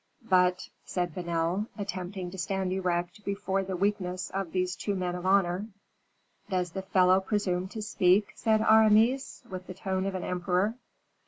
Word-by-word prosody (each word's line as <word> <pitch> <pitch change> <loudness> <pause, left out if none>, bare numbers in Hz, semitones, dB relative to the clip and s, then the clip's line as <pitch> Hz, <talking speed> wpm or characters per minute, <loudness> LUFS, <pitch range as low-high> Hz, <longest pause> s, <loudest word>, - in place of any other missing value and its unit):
"But 180 -2 +3
" - - -43
said 175 -3 -2
Vanel, 170 +3 -1
attempting 185 -2 -5
to 190 - -8
stand 190 +1 -1
erect 180 +1 -2
before 195 -1 -1
the 190 -1 -4
weakness 185 -1 -1
of 195 -3 -3
these 185 -1 -1
two 200 +3 -2
men 180 -1 -2
of 180 +1 -4
honor. 190 +1 +2 0.8
"Does 180 -3 -1
the 190 - -4
fellow 185 -1 +4
presume 190 -2 -1
to 215 +2 -6
speak?" 195 0 +3
said 220 -1 +2
Aramis, 220 +5 +4
with 185 -2 -7
the 185 - -7
tone 190 0 -2
of 195 - -3
an 185 - -3
emperor. 180 +3 0
185 Hz, 165 wpm, -29 LUFS, 180-200 Hz, 0.8 s, fellow